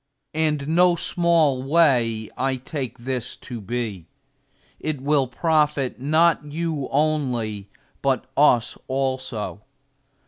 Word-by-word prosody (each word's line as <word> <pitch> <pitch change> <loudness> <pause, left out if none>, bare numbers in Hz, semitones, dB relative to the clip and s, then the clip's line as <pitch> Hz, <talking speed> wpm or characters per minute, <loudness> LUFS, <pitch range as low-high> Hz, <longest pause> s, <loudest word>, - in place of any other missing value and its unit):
And 155 -2 0
no 175 +2 +4
small 165 -6 +2
way 130 -7 +2
I 135 0 0
take 130 0 -5
this 125 0 -4
to 120 -3 -8
be; 105 -5 -4 0.7
it 155 -3 -3
will 140 0 +2
profit 150 -1 +1
not 160 +4 +3
you 150 -1 -3
only, 125 -9 -1 0.3
but 135 -1 +1
us 125 -5 +3
also. 130 -6 -2
135 Hz, 105 wpm, -23 LUFS, 125-155 Hz, 0.7 s, no